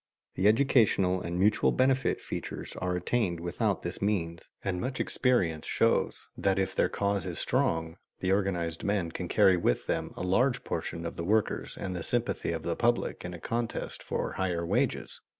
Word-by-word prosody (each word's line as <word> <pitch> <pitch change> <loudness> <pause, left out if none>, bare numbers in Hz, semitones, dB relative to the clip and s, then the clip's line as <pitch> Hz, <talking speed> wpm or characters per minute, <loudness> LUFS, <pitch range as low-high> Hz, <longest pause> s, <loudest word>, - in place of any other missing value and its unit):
The 95 - +2
educational 105 -6 +3
and 85 +1 -3
mutual 105 +3 +3
benefit 130 0 +2
features - - -6
are 90 0 -1
attained 90 -1 0
without 85 0 -1
this - - -5
means; 85 -5 -1 0.2
and 90 -2 -2
much 130 +1 -3
experience 95 - +1
shows - - +1
that, 95 -1 +1
if 95 -1 0
their - - +2
cause 100 -3 -1
is - - -4
strong, 80 0 0 0.2
the 95 - 0
organized 90 -4 0
men 100 -5 0
can - - -5
carry 95 -2 +5
with 60 - +1
them - - -2
a - - -4
large 125 +8 +2
proportion 85 0 -4
of 85 - -5
the 85 - -3
workers 105 +4 0
and 90 -1 -4
the 90 - -3
sympathy 120 +3 +2
of 80 -1 -4
the 85 0 -1
public 120 0 0
in 90 0 -5
a - - -9
contest 115 +5 -3
for - - -3
higher 90 -3 -1
wages. - - 0
95 Hz, 180 wpm, -29 LUFS, 85-110 Hz, 0.2 s, carry